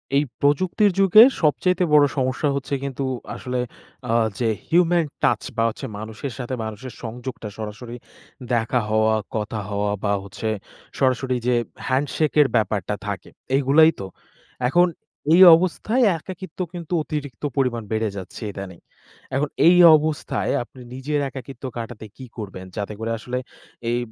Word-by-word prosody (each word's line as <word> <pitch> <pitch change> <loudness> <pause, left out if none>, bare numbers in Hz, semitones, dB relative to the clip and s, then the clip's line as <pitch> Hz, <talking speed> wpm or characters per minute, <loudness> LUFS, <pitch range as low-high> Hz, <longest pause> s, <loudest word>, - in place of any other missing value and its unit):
এই 145 - +4 0.2
প্রযুক্তির 185 +8 +3
যুগে 195 +3 +8 0.2
সবচাইতে 180 +4 +2
বড় 145 -1 +7
সমস্যা 130 +3 0
হচ্ছে 140 0 -4
কিন্তু 140 0 -3 0.3
আসলে 125 0 -3 0.5
আ - - +2 0.3
যে 120 - +1 0.2
human 175 0 +3 0.2
touch - - +2
বা 115 - +2
হচ্ছে 115 - -7
মানুষের 110 +5 -6
সাথে 125 0 -5
মানুষের 110 +4 -7
সংযোগটা 120 -1 -6
সরাসরি 110 +3 -7 0.6
দেখা 120 +2 +1
হওয়া, 110 0 +3 0.2
কথা 110 0 -2
হওয়া 100 0 -1
বা 100 -1 +1
হচ্ছে 100 +3 -5 0.5
সরাসরি 130 0 +1
যে 125 - +3 0.3
হ্যান্ডশেকের 145 +2 +2
ব্যাপারটা 105 -2 0
থাকে। 100 -3 -5 0.3
এইগুলাই 145 +4 +5
তো? 95 - -5 0.6
এখন 175 +5 +5 0.5
এই 180 - +7
অবস্থায় 185 +8 0
একাকিত্ব 185 +1 -10
কিন্তু 175 -1 -6
অতিরিক্ত 150 -3 -6
পরিমাণ 125 -4 0
বেড়ে 110 0 0
যাচ্ছে 95 +4 -8
ইদানিং। 95 -3 -8 0.6
এখন 145 +2 0 0.2
এই 175 +1 +7 0.2
অবস্থায় 155 0 -2
আপনি 125 +1 -15
নিজের 145 +3 -2
একাকিত্ব 135 +1 -10
কাটাতে 115 -1 -6
কি 130 - -9
করবেন? 95 -4 -7
যাতে 105 +1 -3
করে 115 +1 -3
আসলে 125 +3 -4 0.5
এই 120 - +1
130 Hz, 140 wpm, -22 LUFS, 110-150 Hz, 0.6 s, যুগে